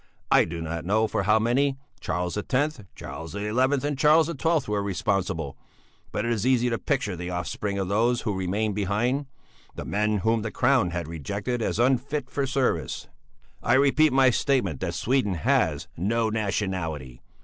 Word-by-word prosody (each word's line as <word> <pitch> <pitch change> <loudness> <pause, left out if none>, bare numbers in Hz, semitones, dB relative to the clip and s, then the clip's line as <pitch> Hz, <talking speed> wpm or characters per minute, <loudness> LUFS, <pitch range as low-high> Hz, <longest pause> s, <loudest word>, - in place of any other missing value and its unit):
I - - +6
do 85 0 -5
not 80 0 -4
know 105 +5 +2
for - - -1
how 105 +3 +4
many 135 +5 +1 0.2
Charles 90 0 -2
X, 135 +7 0 0.2
Charles 80 0 -8
XI, 105 +1 -3 0.4
and 145 -2 -3
Charles 155 +3 +5
XII 165 0 +1
were 105 -1 +1
responsible; 95 - -2 0.5
but - - -2
it 120 - 0
is 110 -4 0
easy 125 -1 +2
to 115 - -1
picture 130 -9 -1
the 90 +1 -5
offspring 95 +3 -3
of 95 -2 -1
those 115 +5 +2
who 105 - -1
remained 100 +3 -1
behind, 110 +8 0 0.5
the - - -6
men 105 +1 0
whom 115 0 +2
the 110 - -3
crown 125 -3 +2
had 85 -2 -4
rejected 100 - -3
as 110 - -1
unfit 130 +3 +1
for 140 -1 -1
service. 135 -1 -1 0.5
"I 120 - +2
repeat 145 +3 +4
my 130 -1 +5
statement 115 - 0
that - - -3
Sweden 125 -6 +1
has 80 - +1
no 110 +5 0
nationality. 95 - -3
110 Hz, 170 wpm, -26 LUFS, 95-130 Hz, 0.5 s, I